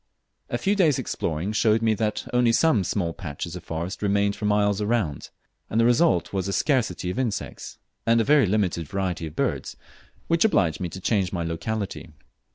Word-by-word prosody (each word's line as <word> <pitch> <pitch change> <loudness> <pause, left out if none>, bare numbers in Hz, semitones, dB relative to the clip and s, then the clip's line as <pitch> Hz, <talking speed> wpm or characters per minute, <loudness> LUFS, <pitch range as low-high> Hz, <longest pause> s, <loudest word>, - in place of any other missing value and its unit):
A - - -1
few 200 +1 +1
days' 165 -9 +3
exploring 80 +6 -2
showed 110 0 +2
me 110 -1 +3
that 105 0 -2
only 125 -1 +4
some 120 - +3
small 85 -3 -1
patches 85 0 -6
of 90 - -8
forest 85 +3 -5
remained 100 0 +1
for 105 - -5
miles 105 0 +2
wound, 105 - -1 0.4
and 110 - 0
the 115 - +4
result 120 - +3
was 95 -1 -1
a 100 - -2
scarcity 100 - 0
of 115 - -4
insects 120 -5 -4 0.3
and 115 0 +3
a - - +3
very 145 -2 +4
limited 90 -5 0
variety 90 -2 -2
of 75 - -11
birds, - - -2 0.5
which 165 0 +2
obliged 90 - +2
me 90 -2 -3
to 95 - -8
change 95 -2 0
my 85 -3 -2
locality. 90 +3 -4
100 Hz, 185 wpm, -25 LUFS, 90-115 Hz, 0.5 s, only